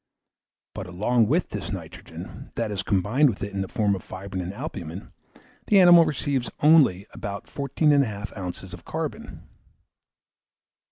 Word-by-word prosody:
But 95 Hz, -, -6 dB
along 110 Hz, +6 st, +2 dB
with 160 Hz, -, +1 dB
this -, -, -5 dB
nitrogen, -, -, -9 dB
that 105 Hz, -, -2 dB
is, 100 Hz, -1 st, -2 dB
combined 105 Hz, +11 st, +2 dB
with 105 Hz, -, -4 dB
it 100 Hz, 0 st, -5 dB
in 100 Hz, -, -2 dB
the 95 Hz, -, -3 dB
form 105 Hz, -1 st, +1 dB
of 95 Hz, -, -3 dB
fibrine 95 Hz, -1 st, -6 dB
or -, -, -12 dB
albumen, 85 Hz, -1 st, -7 dB, 0.5 s
the 205 Hz, -, +6 dB
animal 175 Hz, -2 st, +8 dB
receives 140 Hz, -4 st, -1 dB
only 145 Hz, -, +5 dB
about 100 Hz, -2 st, -6 dB
14 140 Hz, +2 st, +1 dB
1/2 110 Hz, -8 st, 0 dB, 0.3 s
oz. -, -, -11 dB
of -, -, -10 dB
carbon. -, -, -6 dB
105 Hz, 150 wpm, -25 LUFS, 95-145 Hz, 0.5 s, animal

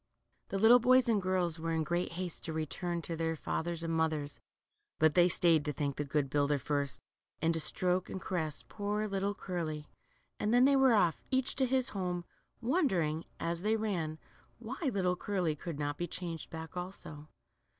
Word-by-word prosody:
The. 195 Hz, -, -1 dB
little 225 Hz, +5 st, +7 dB
boys 255 Hz, +1 st, +5 dB
and 220 Hz, -4 st, +3 dB
girls 180 Hz, -3 st, 0 dB
were 165 Hz, +1 st, -2 dB
in 160 Hz, -1 st, +1 dB
great 175 Hz, +2 st, -1 dB
haste 180 Hz, -1 st, -5 dB
to 160 Hz, -, -4 dB
run 155 Hz, 0 st, -1 dB, 0.2 s
home 175 Hz, -2 st, -1 dB
to 165 Hz, -, -4 dB
their 165 Hz, 0 st, -1 dB
fathers 165 Hz, +2 st, -3 dB
and 165 Hz, 0 st, -1 dB
mothers, 155 Hz, -3 st, -1 dB, 0.6 s
but 155 Hz, -1 st, +4 dB
they 175 Hz, 0 st, +5 dB
stayed 165 Hz, -3 st, +4 dB
to 150 Hz, -, -1 dB
thank 140 Hz, -1 st, -2 dB
the 150 Hz, -, 0 dB
good 145 Hz, 0 st, 0 dB
builder 145 Hz, +1 st, +2 dB
first, 140 Hz, -1 st, -1 dB, 0.4 s
and 165 Hz, 0 st, +2 dB
to 165 Hz, -, +1 dB
stroke 180 Hz, +3 st, 0 dB
and 190 Hz, -, -4 dB
caress 160 Hz, -6 st, -3 dB
poor 210 Hz, +1 st, -2 dB
little 200 Hz, 0 st, -1 dB
Curly, 160 Hz, -6 st, -4 dB, 0.5 s
and 210 Hz, -, 0 dB
then 245 Hz, +2 st, +6 dB
they 280 Hz, 0 st, +5 dB
were 265 Hz, -3 st, +5 dB
off, 175 Hz, -6 st, +2 dB
each 260 Hz, -1 st, +1 dB
to 265 Hz, -1 st, +3 dB
his 260 Hz, 0 st, +2 dB
home, 180 Hz, -3 st, -3 dB, 0.4 s
wondering, 190 Hz, -, +1 dB
as 170 Hz, 0 st, -2 dB
they 215 Hz, +3 st, +2 dB
ran, 180 Hz, -8 st, -2 dB, 0.4 s
why 240 Hz, +3 st, -7 dB
little 185 Hz, -3 st, +1 dB
Curly 180 Hz, -4 st, -1 dB
could 165 Hz, 0 st, -6 dB
not 145 Hz, 0 st, -3 dB
be 175 Hz, -, -1 dB
changed 170 Hz, -2 st, -5 dB
back 160 Hz, 0 st, -8 dB
also. 180 Hz, -5 st, -7 dB
175 Hz, 190 wpm, -33 LUFS, 155-200 Hz, 0.6 s, little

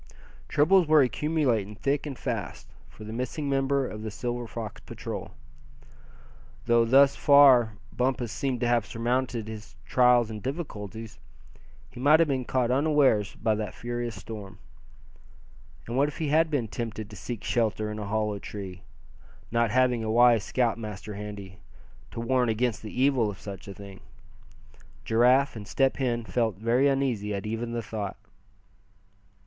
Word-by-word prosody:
Troubles 175 Hz, +4 st, +4 dB
were 155 Hz, -2 st, +6 dB
accumulating 125 Hz, -5 st, 0 dB
thick 140 Hz, +6 st, -1 dB
and 135 Hz, -3 st, -6 dB
fast, -, -, -4 dB, 0.2 s
for 95 Hz, +7 st, -13 dB
the 110 Hz, +1 st, -7 dB
missing 130 Hz, +5 st, -3 dB
member 135 Hz, -1 st, +1 dB
of 105 Hz, -, -7 dB
the 110 Hz, -, -4 dB
Silver 120 Hz, +2 st, -4 dB
Fox 110 Hz, -2 st, -7 dB
Patrol. -, -, -7 dB, 1.4 s
Though 120 Hz, 0 st, +4 dB
thus 135 Hz, +3 st, +5 dB
far 135 Hz, -6 st, +6 dB, 0.2 s
Bumpus 125 Hz, -2 st, -1 dB
seemed 130 Hz, -1 st, -2 dB
to 120 Hz, -, +1 dB
have 120 Hz, -3 st, +1 dB
surmounted 120 Hz, -1 st, -1 dB
his 105 Hz, -9 st, -9 dB
trials 120 Hz, -, +4 dB
and 105 Hz, -1 st, -6 dB
difficulties, 115 Hz, -, -6 dB, 0.7 s
he -, -, -11 dB
might 150 Hz, +4 st, +5 dB
have 165 Hz, -, +4 dB
been 130 Hz, -2 st, -1 dB
caught 125 Hz, -1 st, 0 dB
unawares 135 Hz, -7 st, +2 dB
by 110 Hz, -, 0 dB
that 105 Hz, 0 st, -4 dB
furious 120 Hz, -1 st, -4 dB
storm. 100 Hz, -1 st, -9 dB, 1.3 s
And 120 Hz, -, -5 dB
what 140 Hz, +2 st, +3 dB
if 150 Hz, -, -7 dB
he 155 Hz, -3 st, -2 dB
had 160 Hz, +2 st, +3 dB
been 140 Hz, -7 st, -1 dB
tempted 110 Hz, -1 st, -5 dB
to 105 Hz, -, -12 dB
seek 115 Hz, +2 st, -6 dB
shelter 110 Hz, -2 st, 0 dB
in 105 Hz, -, -5 dB
a 105 Hz, -, -5 dB
hollow 105 Hz, -1 st, -1 dB
tree, 95 Hz, -3 st, -8 dB, 0.7 s
not 115 Hz, -1 st, +2 dB
having 125 Hz, 0 st, +2 dB
a 110 Hz, -, -3 dB
wise 120 Hz, -1 st, +5 dB
scoutmaster 110 Hz, -4 st, -2 dB
handy, 100 Hz, -2 st, -8 dB, 0.5 s
to -, -, -7 dB
warn 125 Hz, +1 st, +1 dB
against 115 Hz, 0 st, 0 dB
the 110 Hz, +3 st, -7 dB
evil 130 Hz, -5 st, +3 dB
of 95 Hz, -, -8 dB
such 100 Hz, -1 st, -9 dB
a 100 Hz, -, -7 dB
thing? 100 Hz, -1 st, -11 dB, 1.1 s
Giraffe 125 Hz, +5 st, +3 dB
and 105 Hz, -2 st, -8 dB
Step 135 Hz, +3 st, +1 dB
Hen 120 Hz, -4 st, -1 dB
felt 115 Hz, -4 st, 0 dB
very 120 Hz, +6 st, +2 dB
uneasy 125 Hz, -7 st, 0 dB
at 100 Hz, -, -5 dB
even 115 Hz, +2 st, -3 dB
the 120 Hz, -1 st, -3 dB
thought. 110 Hz, -3 st, -5 dB
120 Hz, 155 wpm, -27 LUFS, 105-130 Hz, 1.4 s, were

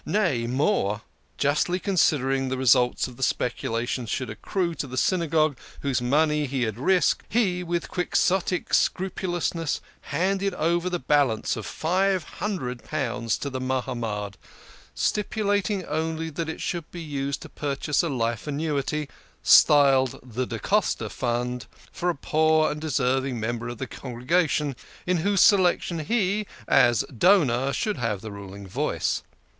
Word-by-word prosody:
Nay, 170 Hz, -, 0 dB
more! 120 Hz, -, 0 dB, 0.3 s
Justly 150 Hz, +5 st, +1 dB
considering 135 Hz, -9 st, +1 dB
the 130 Hz, -, -2 dB
results 125 Hz, -1 st, +3 dB
of 125 Hz, -2 st, -12 dB
the -, -, -11 dB
speculation 120 Hz, -1 st, -1 dB
should 130 Hz, +3 st, -2 dB
accrue 180 Hz, -3 st, -2 dB
to 145 Hz, -, -4 dB
the 130 Hz, 0 st, -7 dB
Synagogue, 155 Hz, -4 st, +2 dB, 0.2 s
whose 135 Hz, -3 st, 0 dB
money 150 Hz, +3 st, +2 dB
had 125 Hz, -4 st, -1 dB
been 120 Hz, +6 st, -9 dB
risked, 190 Hz, -1 st, +3 dB
he, 195 Hz, -6 st, +1 dB
with 175 Hz, -1 st, -2 dB
Quixotic 180 Hz, 0 st, 0 dB
scrupulousness, 175 Hz, -4 st, 0 dB, 0.3 s
handed 195 Hz, +1 st, 0 dB
over 170 Hz, +2 st, +1 dB
the 180 Hz, -, -1 dB
balance 135 Hz, -6 st, +1 dB
of 110 Hz, -3 st, -6 dB
five 185 Hz, +2 st, +1 dB
hundred 155 Hz, -, -4 dB
pounds 125 Hz, -6 st, -2 dB
to 140 Hz, -, -4 dB
the 130 Hz, 0 st, -4 dB
Mahamad, 120 Hz, -6 st, -3 dB, 0.6 s
stipulat 205 Hz, -1 st, 0 dB
ing 195 Hz, -4 st, -2 dB
only 160 Hz, +1 st, -2 dB
that 160 Hz, +1 st, -3 dB
it 160 Hz, -, -5 dB
should 170 Hz, -3 st, -3 dB
be 175 Hz, -, -8 dB
used 140 Hz, -3 st, -3 dB
to -, -, -10 dB
purchase 145 Hz, +1 st, -1 dB
a 170 Hz, -, -2 dB
life 115 Hz, -2 st, -2 dB
annuity 150 Hz, 0 st, -1 dB, 0.4 s
(styled 135 Hz, -4 st, +6 dB
the 125 Hz, 0 st, -3 dB
Da 115 Hz, -, -4 dB
Costa 190 Hz, -, 0 dB
Fund) 120 Hz, -1 st, -2 dB, 0.2 s
for 180 Hz, -, -1 dB
a 175 Hz, -, 0 dB
poor 155 Hz, +2 st, +2 dB
and 150 Hz, -, -5 dB
deserving 130 Hz, -3 st, 0 dB
member 115 Hz, +1 st, -3 dB
of 120 Hz, -, -6 dB
the 130 Hz, -, -4 dB
congregation, 140 Hz, +4 st, -1 dB, 0.3 s
in 180 Hz, 0 st, +1 dB
whose 200 Hz, +4 st, +2 dB
selection 180 Hz, -4 st, +4 dB
he, 205 Hz, +3 st, 0 dB, 0.2 s
as 120 Hz, -4 st, +4 dB
donor, 140 Hz, -, +4 dB
should 210 Hz, +7 st, -1 dB
have 115 Hz, -5 st, -2 dB
the 110 Hz, -, -7 dB
ruling 100 Hz, 0 st, -9 dB
voice. 130 Hz, +11 st, -1 dB
145 Hz, 145 wpm, -25 LUFS, 125-175 Hz, 0.6 s, styled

